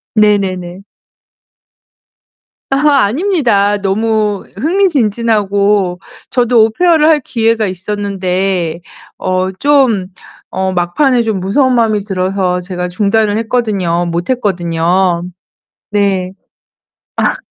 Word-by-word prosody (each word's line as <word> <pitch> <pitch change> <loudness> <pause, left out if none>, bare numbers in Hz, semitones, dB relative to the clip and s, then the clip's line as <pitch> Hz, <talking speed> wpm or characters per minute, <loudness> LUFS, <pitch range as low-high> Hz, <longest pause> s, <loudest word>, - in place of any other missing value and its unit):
네네네. 195 -4 +1 1.9
아 280 0 +3
아닙니다. 235 - +1
너무 210 +1 -1
흥미진진하고 210 - +1 0.3
저도 240 -2 +3
오페어를 315 +7 +2
할 315 -2 +4
기회가 225 -4 0
있었는데 185 -3 -2 0.4
어 185 0 -1
좀 265 -10 +2 0.5
어 190 0 0
막판에 235 - +1
좀 220 -4 -1
무서운 255 +8 +1
마음이 220 -4 +1
들어서 185 -2 -1
제가 180 0 -4
중단을 205 +3 +1
했거든요. 205 -7 -1
못 170 +1 -3
했거든요. 175 -5 0 0.7
네. 195 -3 0 1.0
아. - - 0
205 Hz, 215 characters per minute, -13 LUFS, 185-230 Hz, 1.9 s, 할